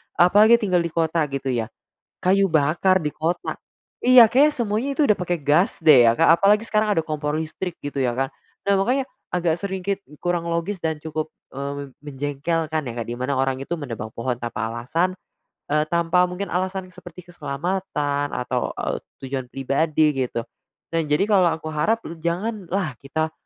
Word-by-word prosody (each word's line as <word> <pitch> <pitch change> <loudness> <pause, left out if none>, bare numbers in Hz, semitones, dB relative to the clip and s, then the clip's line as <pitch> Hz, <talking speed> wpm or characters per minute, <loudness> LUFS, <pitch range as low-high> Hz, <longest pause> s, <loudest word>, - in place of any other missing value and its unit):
apalagi 210 +6 +6
tinggal 200 -6 +1
di 170 - 0
kota 165 0 +1
gitu 135 -1 -3
ya. 115 -3 -1 0.5
Kayu 195 +2 +4
bakar 165 +5 +3
di 150 - -1
kota, 165 +3 -2 0.5
iya 250 -1 +9
kayaknya 290 +4 +5
semuanya 230 +2 -1
itu 305 - +4
udah 210 - +4
pake 175 -2 -2
gas 170 +9 +3
deh 135 -6 +8
ya, - - +4
Kak, 165 0 +6
apalagi 205 +3 +4
sekarang 215 -2 +1
ada - - +4
kompor 150 -1 -2
listrik 160 +3 -4
gitu 145 -1 -4
ya 125 -2 +1
kan. 135 +1 0 0.4
Nah, 200 - +3
makanya 255 +7 +1 0.3
agak 170 -2 +1
sedikit 195 0 -2 0.2
kurang 175 -1 0
logis 170 +3 -2
dan 160 -1 -1
cukup, 155 0 -3 0.2
eee, 140 +1 -4
mem 140 0 -6
menjengkelkan 150 +3 -2
ya, 120 - -5
Kak, 115 - -3
di 120 - -4
mana 135 +2 -1
orang 135 0 0
itu 135 - -4
menebang 120 -7 -5
pohon 125 +1 -2
tanpa 115 -2 -3
alasan, 160 +11 -1 0.6
eee, 150 +1 +2
tanpa 170 +1 +3
mungkin 195 +2 -4
alasan 185 +1 -2
seperti 180 -1 -12
keselamatan 145 -2 -2
atau, 125 - -2
eee, - - -2 0.3
tujuan 130 -1 -3
pribadi 150 +3 +1
gitu. 125 -3 -2 0.5
Nah 165 - +2
jadi 150 +5 +2
kalau 190 -4 +5
aku 160 0 -5
harap 215 +10 0
m 165 0 -8
janganlah 180 - -2
kita 160 +3 -2
165 Hz, 175 wpm, -23 LUFS, 140-185 Hz, 0.6 s, iya